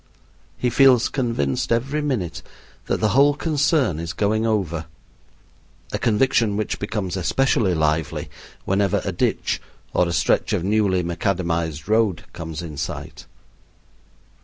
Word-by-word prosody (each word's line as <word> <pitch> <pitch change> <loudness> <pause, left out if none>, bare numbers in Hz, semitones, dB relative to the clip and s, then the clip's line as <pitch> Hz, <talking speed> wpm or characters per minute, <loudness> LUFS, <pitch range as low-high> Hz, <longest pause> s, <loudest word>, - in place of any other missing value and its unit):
He 125 - 0
feels 130 -1 +5
convinced 115 - -1
every 135 +6 0
minute 120 - -2 0.5
that - - 0
the 110 - +2
whole 140 +6 +4
concern 145 - +1
is 85 +1 -4
going 110 +2 +1
over, 85 -7 -1 1.1
a - - -1
conviction 115 -2 +2
which 110 - -2
becomes 105 -3 -3
especially 95 0 +1
lively 80 -1 0 0.4
whenever 95 0 +1
a - - -1
ditch - - -1 0.3
or 90 - +3
a - - -2
stretch 85 - +1
of - - 0
newly 100 -2 +2
macadamized 85 -3 -2
road 110 -4 +2
comes 80 0 -6
in 75 -4 -7
sight. 75 - -6
100 Hz, 130 wpm, -22 LUFS, 85-115 Hz, 1.1 s, feels